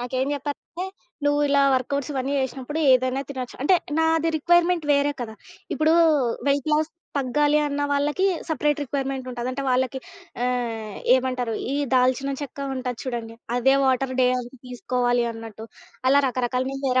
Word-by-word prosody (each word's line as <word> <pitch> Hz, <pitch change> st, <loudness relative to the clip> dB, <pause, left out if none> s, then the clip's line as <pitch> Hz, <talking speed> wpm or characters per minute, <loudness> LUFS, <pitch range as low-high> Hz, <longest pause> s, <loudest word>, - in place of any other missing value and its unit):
నాకేం 255 Hz, +2 st, -1 dB
జెప్పారంటే, 290 Hz, +5 st, -5 dB, 0.4 s
"నువ్వు 290 Hz, 0 st, +2 dB
ఇలా 280 Hz, 0 st, +4 dB
వర్కౌట్స్ 280 Hz, +3 st, -1 dB
ఇవన్నీ 270 Hz, 0 st, -2 dB
జేశినప్పుడు 265 Hz, +3 st, -3 dB
ఏదైనా 255 Hz, +1 st, +3 dB
తినొచ్చు," 255 Hz, -3 st, -6 dB
అంటే 330 Hz, +7 st, +4 dB, 0.2 s
నాది 320 Hz, 0 st, +2 dB
రిక్వైర్మెంట్ 345 Hz, +1 st, +3 dB
వేరే 285 Hz, +1 st, +2 dB
కదా! 220 Hz, -2 st, -5 dB, 0.4 s
ఇప్పుడు 310 Hz, +1 st, +2 dB, 0.6 s
వెయిట్ 280 Hz, +2 st, +1 dB
లాస్ 305 Hz, +1 st, +2 dB, 0.3 s
తగ్గాలి 295 Hz, +3 st, +2 dB
అన్న 290 Hz, 0 st, -2 dB
వాళ్ళకి 295 Hz, +6 st, +1 dB, 0.2 s
సెపరేట్ 295 Hz, -1 st, +1 dB
రిక్వైర్మెంట్ 270 Hz, -1 st, -3 dB
ఉంటది. 245 Hz, 0 st, -4 dB
అంటే 275 Hz, +2 st, -4 dB
వాళ్ళకి 260 Hz, +1 st, +1 dB, 0.5 s
ఆహ్, 230 Hz, -4 st, -2 dB, 0.2 s
ఏమంటారు 255 Hz, -2 st, 0 dB, 0.2 s
ఈ -, -, 0 dB, 0.2 s
దాల్చిన 255 Hz, +2 st, +2 dB
చెక్క 285 Hz, -1 st, -7 dB, 0.2 s
ఉంటది 250 Hz, -2 st, -4 dB
చూడండి. 235 Hz, -3 st, -4 dB, 0.2 s
అదే 265 Hz, +2 st, +4 dB
వాటర్ 260 Hz, 0 st, +1 dB
డే 250 Hz, -, +5 dB, 0.4 s
తీసుకోవాలి 245 Hz, -1 st, 0 dB
అన్నట్టు, 225 Hz, -1 st, -9 dB, 0.4 s
అలా 280 Hz, +2 st, +6 dB
రకరకాల 250 Hz, 0 st, -1 dB, 0.2 s
వేరే 255 Hz, 0 st, +3 dB
265 Hz, 140 wpm, -24 LUFS, 250-290 Hz, 0.6 s, అలా